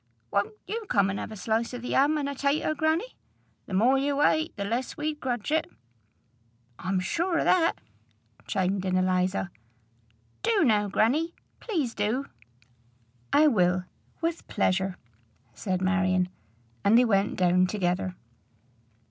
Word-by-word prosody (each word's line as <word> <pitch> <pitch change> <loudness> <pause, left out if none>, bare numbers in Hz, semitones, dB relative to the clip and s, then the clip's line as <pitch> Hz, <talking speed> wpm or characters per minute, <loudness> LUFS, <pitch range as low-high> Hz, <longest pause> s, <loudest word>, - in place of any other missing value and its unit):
Won't 200 - 0
you 445 -1 -5
come 195 -1 +3
and 195 - -4
have - - -6
a - - -7
slice 225 +4 -1
o' - - -3
the 245 +1 -5
'am, 290 +3 +4
an' 285 -2 -1
a 280 - -3
tater, 285 +3 0
grannie? 315 +10 -1 0.5
The 190 - -3
more 250 +7 +4
you 285 +1 +1
ate, 315 +2 +2
the 200 - -3
less 235 +5 -2
we'd 300 0 -3
grudge 245 -2 -3
it." 315 0 +1 1.1
"I'm 185 0 -1
sure 340 - 0
o' - - +1
that," 340 -3 +3 0.7
chimed 190 0 0
in 185 -1 0
Eliza. 185 0 +1 0.9
"Do 440 -4 +2
now, 210 -6 +3
grannie; 275 - +1 0.2
please 310 - -2
do." 220 +7 -1 1.1
"I 305 - +5
will, 180 -9 +3 0.4
with 335 0 -2
pleasure," 190 0 0 0.6
said 185 - -2
Marion; 185 -1 +2 0.5
and 215 +3 +5
they 250 - +6
went 200 -3 +1
down 180 0 +3
together. 180 -1 -1
225 Hz, 145 wpm, -27 LUFS, 190-300 Hz, 1.1 s, they